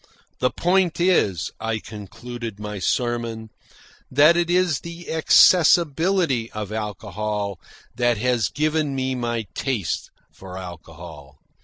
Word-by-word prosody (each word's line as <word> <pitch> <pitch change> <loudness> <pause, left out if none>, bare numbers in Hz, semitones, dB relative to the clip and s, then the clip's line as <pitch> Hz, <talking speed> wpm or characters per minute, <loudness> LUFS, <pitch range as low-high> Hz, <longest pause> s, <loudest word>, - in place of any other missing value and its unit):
"The 125 - +2
point 175 +4 +1
is," 105 - +2
I 115 0 -2
concluded 110 +1 -8
my 105 -1 -5
sermon, 115 +1 -2 0.6
"that 150 +5 +5
it 175 0 +1
is 180 -4 +2
the 170 0 -8
accessibility 165 -4 +4
of 105 -1 -5
alcohol 105 -1 -4 0.3
that 120 -2 +1
has 120 -2 +1
given 155 -1 0
me 130 0 -1
my 120 -3 -2
taste 125 -10 -2 0.2
for 95 -1 -10
alcohol. 80 -5 -10
120 Hz, 115 wpm, -23 LUFS, 105-155 Hz, 0.6 s, that